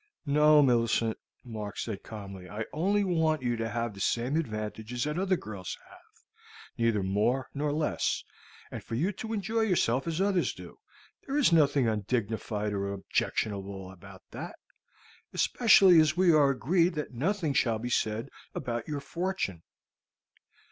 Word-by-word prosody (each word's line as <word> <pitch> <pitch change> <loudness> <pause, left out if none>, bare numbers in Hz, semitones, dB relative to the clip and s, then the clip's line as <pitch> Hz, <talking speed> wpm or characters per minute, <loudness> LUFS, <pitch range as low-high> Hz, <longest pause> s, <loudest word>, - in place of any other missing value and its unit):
"No, 150 +1 +5
Millicent," 115 -3 +2 0.3
Mark 110 -4 -6
said 105 -4 -4
calmly. 100 -4 -9
"I 105 +2 -4
only 200 +6 +1
want 160 -6 +1
you 120 -1 0
to 115 0 -2
have 115 0 -2
the 100 - -11
same 120 +7 0
advantages 110 -3 -3
that 150 +3 -2
other 190 -1 +1
girls 100 - -7
have, - - -20 0.5
neither 115 -4 +1
more 105 +7 0
nor 145 +1 -1
less, 150 +1 0 0.5
and - - -6
for 115 - -5
you 170 - +1
to 220 +3 -7
enjoy 220 +1 -1
yourself 150 - +1
as 165 0 -2
others 195 -2 +1
do. - - -12 0.5
There 275 +1 -1
is 270 -12 +4
nothing 145 -5 +4
undignified 105 -1 -2
or 100 0 -2
objectionable 100 -1 -2
about 95 +1 -14
that, - - -7 0.8
especially 195 -7 +6
as 155 +1 +3
we 180 -2 +5
are 145 -2 +5
agreed 170 +6 +2
that 150 -3 -4
nothing 160 - 0
shall 115 -4 +2
be 120 +3 -5
said 110 +3 0 0.3
about 120 -1 -3
your 145 -2 -3
fortune. 170 - -3
125 Hz, 150 wpm, -29 LUFS, 110-165 Hz, 0.8 s, especially